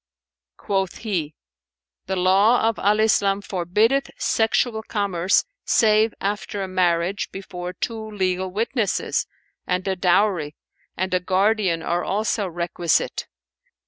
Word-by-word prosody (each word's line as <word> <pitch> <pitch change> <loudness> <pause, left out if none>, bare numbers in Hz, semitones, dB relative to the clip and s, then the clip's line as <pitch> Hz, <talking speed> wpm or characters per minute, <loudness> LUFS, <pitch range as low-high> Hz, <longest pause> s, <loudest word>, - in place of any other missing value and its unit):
Quoth 195 -2 -1
he, 170 -9 -3 0.7
"The 190 - -1
law 195 +6 +4
of 225 - -1
Al 210 +2 +2
Islam 200 -2 +3
forbiddeth 210 +7 +1
sexual 225 0 +1
commerce 200 -4 +1 0.2
save 215 -1 +3
after 205 0 -3
a - - -4
marriage 180 +1 0
before 180 -2 -7
two 220 +2 -4
legal 185 -2 -1
witnesses, 220 +2 -1 0.4
and 180 +1 -1
a 190 - 0
dowry 180 -4 +1 0.4
and 185 +1 -2
a 180 - +3
guardian 190 -2 +1
are 175 +1 -1
also 210 0 -1
requisite. 170 -1 -1
195 Hz, 115 wpm, -23 LUFS, 180-215 Hz, 0.7 s, law